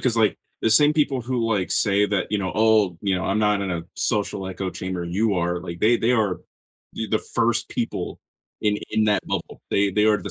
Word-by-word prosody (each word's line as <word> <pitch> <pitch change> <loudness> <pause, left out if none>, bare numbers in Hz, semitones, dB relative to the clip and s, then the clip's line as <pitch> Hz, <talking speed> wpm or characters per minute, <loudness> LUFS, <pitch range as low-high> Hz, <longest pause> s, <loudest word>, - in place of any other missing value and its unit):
'cause, 120 -3 0
like, 110 -2 +2 0.2
the 115 - +2
same 145 +7 +6
people 145 -4 +1
who, 120 0 -2
like, 100 -5 0
say 100 -1 +3
that, 100 -2 -1
you 105 - +1
know, 95 -2 -3
"Oh" 110 -5 +3
you 100 -2 +1
know, 90 - -2
"...I'm 100 - 0
not 105 -1 +2
in 95 - -2
a 85 -2 -3
social 100 -3 -1
echo 95 0 -4
chamber. 95 -1 -4
You 100 +5 0
are." 90 0 -1
Like, 85 -1 -7
they 115 +3 +4
they 115 +2 +1
are 105 -6 +1 0.5
e - - -3
the - - +1
first - - 0
people - - -4 0.4
in 105 -1 +1
in 110 0 +2
that 105 -1 +1
bubble. - - -4
They 100 0 +2
they 105 +2 +2
are 105 -1 +4
the 100 - -6
105 Hz, 225 wpm, -23 LUFS, 95-110 Hz, 0.5 s, same